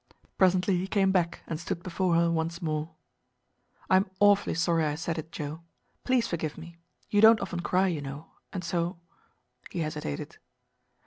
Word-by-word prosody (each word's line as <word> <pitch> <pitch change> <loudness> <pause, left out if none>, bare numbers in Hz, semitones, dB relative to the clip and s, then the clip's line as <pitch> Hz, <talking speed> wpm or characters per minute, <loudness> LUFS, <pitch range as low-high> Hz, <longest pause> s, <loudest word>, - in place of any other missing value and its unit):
Presently 185 0 +4
he 185 +2 -2
came 195 -1 +2
back 175 -3 0
and 160 - -4
stood 170 0 -4
before 180 -1 0
her 170 0 +3
once 165 +1 -1
more. 155 -1 -3 0.9
"I 185 - +5
am 190 0 +1
awfully 205 -3 +4
sorry 165 -1 +2
I 150 -1 0
said 165 +1 -3
it, 160 +1 -8
Joe. 155 +1 -5 0.4
Please 250 -3 +2
forgive 160 -6 -3
me. 170 +1 -11 0.3
You 205 - +4
don't 220 0 +8
often 180 -3 -4
cry, 185 +2 +2
you 170 -6 -1
know, 140 +3 -8 0.2
and 185 -2 -4
so" 170 +1 -1 0.7
He 170 - -3
hesitated. 150 - -4
170 Hz, 170 wpm, -28 LUFS, 160-190 Hz, 0.9 s, don't